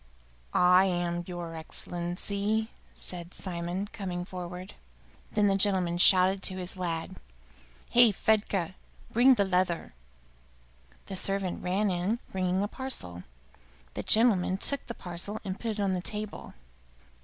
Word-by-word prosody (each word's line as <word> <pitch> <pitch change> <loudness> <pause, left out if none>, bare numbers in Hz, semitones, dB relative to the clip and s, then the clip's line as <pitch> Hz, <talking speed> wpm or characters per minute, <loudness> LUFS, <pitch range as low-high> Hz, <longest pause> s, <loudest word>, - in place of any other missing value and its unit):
"I 180 +1 +6
am, 175 -1 -1
your 175 -2 -5
Excellency," 200 +7 -2 0.2
said 175 -1 -6
Simon, 175 +1 -3
coming 180 -3 -4
forward. 180 0 -7 0.6
Then 210 -1 +2
the 195 -1 +4
gentleman 185 -3 +1
shouted 190 +1 +6
to 190 -1 -2
his 180 0 -3
lad, 170 -3 -3 0.7
"Hey, 240 -2 +7
Fedka, 200 -3 +1 0.4
bring 250 +3 +6
the 200 - +2
leather!" 180 - 0 1.1
The 195 - -6
servant 195 -1 -1
ran 195 +3 +1
in, 180 +6 0
bringing 185 0 0
a - - 0
parcel. 95 - -6 0.7
The - - -3
gentleman 205 -5 +4
took 280 +7 0
the 235 - -5
parcel 180 +4 -4
and 190 0 -4
put 230 -2 -2
it 210 - -7
on 195 -2 +1
the 180 - -1
table. 210 +2 -5
185 Hz, 130 wpm, -29 LUFS, 175-205 Hz, 1.1 s, Hey